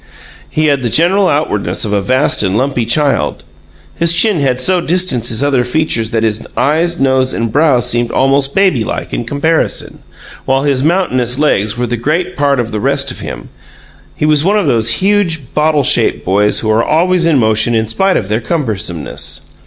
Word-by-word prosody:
He 155 - 0
had 140 -3 +1
the 120 - -1
general 185 - +2
outwardness 145 - -1
of 105 - -3
a 100 - +1
vast 130 +8 +1
and 100 0 0
lumpy 125 -2 -1
child. 135 - 0 0.5
His 170 0 +1
chin 190 +1 +2
had 130 -3 0
so 180 +7 +1
distanced 170 -9 0
his 115 +4 0
other 135 -3 +1
features 125 -4 -1
that 115 -1 -1
his 110 -1 -2
eyes, 170 +4 +1
nose, 130 -1 +1
and 115 -1 -2
brow 145 -2 +3
seemed 120 -1 -1
almost 135 +2 +1
baby 185 - +2
like - - -5
in 120 - -3
comparison, 150 +6 -1 0.5
while 135 +1 +1
his 140 -3 0
mountainous 130 -8 +1
legs 110 -8 0
were 125 - -1
the 120 0 -3
great 160 +9 -2
part 140 -2 +1
of 115 -1 -2
the 105 - -3
rest - - 0
of - - -9
him. - - -8 0.7
He - - -1
was 150 -1 +3
one 200 +4 +2
of 205 - 0
those 115 -5 +1 0.2
huge, 175 -9 0
bottle 150 -1 +1
shaped - - +1
boys 105 +3 +1
who 110 - 0
are 110 +2 +2
always 170 +3 +2
in 160 -4 +3
motion 110 0 +1
in 110 -1 0
spite 190 - +1
of - - -3
their 110 +3 -1
cumbersomeness. 110 - -4
135 Hz, 190 wpm, -13 LUFS, 115-160 Hz, 0.7 s, brow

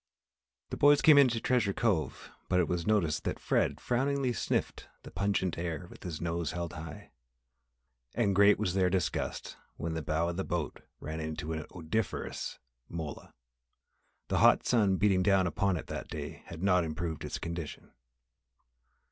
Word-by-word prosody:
The - - -3
boys 145 0 +6
came 150 -2 +8
into 125 -4 +4
Treasure 115 -5 +1
Cove 100 -9 -1 0.2
but 90 - +3
it 85 - +2
was 85 +2 -2
noticed 90 -8 +1
that - - -1
Fred - - 0
frowningly 135 +1 0
sniffed - - -2 0.2
the - - -10
pungent 95 -3 0
air 85 0 -3
with 85 -5 -7
nose 85 -1 -2
held 85 -2 -4
high. 80 -2 -9 1.0
And 110 -4 +2
great 100 +1 +6
was 95 -4 -1
their 95 -1 +3
disgust 90 -1 -2 0.2
when 80 +2 -3
the 80 - -2
bow 80 +2 0
of 85 - -4
the 95 - -1
boat 85 -5 -3 0.2
ran 80 +1 -5
into 80 0 -4
an 80 -1 -5
odoriferous 90 +3 -3 0.3
mola. 80 -3 -7 0.9
The - - +1
hot - - +5
sun 105 -6 +3
beating 95 -1 +3
down 95 -1 +4
upon 95 +1 +1
it - - -6
that - - -6
day - - -6
had 85 +2 -8
not 90 -2 +4
improved 80 0 -4
its - - -4
condition. 85 -2 -6
90 Hz, 160 wpm, -31 LUFS, 80-105 Hz, 1.0 s, came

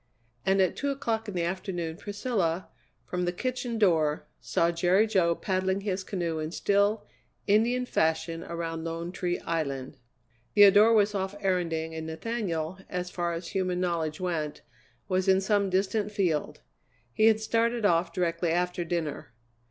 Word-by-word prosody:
And 195 +1 +4
at 185 - 0
two 285 - -2
o'clock 230 -5 -2
in 205 - -5
the 175 - 0
afternoon 175 -2 -3
Priscilla, 200 -3 -2 0.4
from 180 0 -2
the 175 - 0
kitchen 245 +4 -3
door, 160 -7 +2
saw 170 0 +1
Jerry 180 +5 +3
Jo 185 -6 +2
paddling 190 +1 -1
his 195 -2 -2
canoe 170 -5 -2
in 155 0 -3
still, 200 +3 +1 0.4
Indian 235 +5 +3
fashion 160 -4 0
around 165 -1 -4
Lone 165 +1 -4
Tree 180 -1 -2
Island. 140 -5 -3 0.6
Theodora 205 +2 +7
was 210 -1 +3
off 195 0 -3
erranding, 170 -4 -1
and 160 0 -5
Nathaniel, 170 -1 -3
as 180 -1 -3
far 175 -1 -2
as 170 0 -5
human 185 -2 -1
knowledge 165 -4 -1
went, 165 -5 -3 0.4
was 185 0 0
in 190 0 +5
some 200 0 +1
distant 200 +3 0
field; 180 -8 -1 0.5
he 215 - +4
had 220 -1 +5
started 230 +1 +1
off 170 -2 +3
directly 170 -1 0
after 180 +1 0
dinner. 160 -7 -3
180 Hz, 150 wpm, -28 LUFS, 165-205 Hz, 0.6 s, Theodora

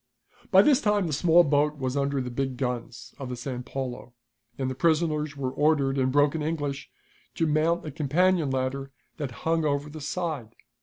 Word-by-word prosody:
By 190 0 +7
this 285 +1 +4
time 210 -3 +2
the 160 - -2
small 170 +4 +5
boat 150 0 +1
was 130 -1 -2
under 140 -1 0
the 125 -1 -5
big 130 0 -2
guns 125 -2 -4
of 135 -2 -5
the 125 - -3
San 125 0 -5
Paulo, 125 -1 -6 0.4
and 130 - -2
the 130 - -2
prisoners 155 0 +1
were 130 -2 -2
ordered, 140 -2 +2
in 130 0 +2
broken 145 +3 +2
English, 145 -3 -3 0.5
to 165 - +1
mount 160 +3 +1
a 155 - -5
companion 160 +3 +2
ladder 135 +1 -2 0.3
that 145 -4 -3 0.2
hung 165 0 +2
over 145 0 -1
the 155 0 -8
side. 150 -8 -4
145 Hz, 185 wpm, -26 LUFS, 130-160 Hz, 0.5 s, By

